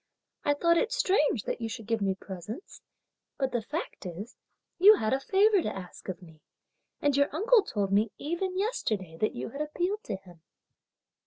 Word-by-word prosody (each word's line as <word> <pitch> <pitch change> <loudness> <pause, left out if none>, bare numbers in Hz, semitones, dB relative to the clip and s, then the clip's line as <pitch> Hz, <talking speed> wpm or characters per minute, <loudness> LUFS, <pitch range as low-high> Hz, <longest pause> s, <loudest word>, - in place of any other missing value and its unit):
I 290 - +2
thought 335 +3 +3
it 465 - 0
strange 300 - +2
that - - -3
you 225 - -2
should 225 -1 -7
give 225 0 -1
me 195 -1 +1
presents; 195 - -8 0.6
but 265 -2 0
the 240 - 0
fact 305 +10 -5
is 190 +7 -7 0.4
you 415 +4 +9
had 215 - 0
a 265 - +2
favour 400 +6 +4
to - - -3
ask 185 +1 -9
of 185 0 -5
me; 160 -3 -16 0.6
and 290 -1 +3
your 285 0 +3
uncle 440 +9 +4
told 200 - -2
me 205 +2 +3
even 365 +5 -2
yesterday 215 - -1
that 215 - 0
you 125 - -4
had 280 - -6
appealed 355 +7 -2
to 210 - -2
him!" 180 -4 -14
260 Hz, 185 wpm, -29 LUFS, -, 0.6 s, you